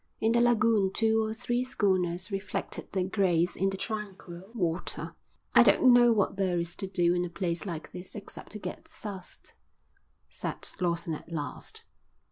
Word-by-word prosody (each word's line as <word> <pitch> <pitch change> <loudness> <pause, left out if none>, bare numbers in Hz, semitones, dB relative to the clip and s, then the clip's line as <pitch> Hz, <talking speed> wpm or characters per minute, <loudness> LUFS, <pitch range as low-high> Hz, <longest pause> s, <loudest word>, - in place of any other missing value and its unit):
In 220 - +2
the 235 0 +4
lagoon 225 -4 +4
two 220 +1 +2
or 220 - -2
three 240 +2 -1
schooners 185 -5 0
reflected 195 -1 -4
their 190 -1 0
grace 180 -3 +2
in 195 +2 +1
the 195 - -4
tranquil 195 -3 -4
water. 175 -5 -2 0.4
"I - - +9
don't 255 -1 +6
know 240 -1 +7
what 205 -3 +1
there 185 -3 +1
is 170 0 -3
to 195 - -4
do 175 -2 +2
in 175 0 +1
a 180 - -3
place 170 +2 -2
like 165 -3 -5
this 180 +4 -9
except 205 0 -10
to - - -5
get 210 - -7
soused," 195 -4 -7 0.8
said - - -5
Lawson 170 -2 0
at 160 +2 -8
last. 150 -3 -5
190 Hz, 170 wpm, -29 LUFS, 175-220 Hz, 0.8 s, I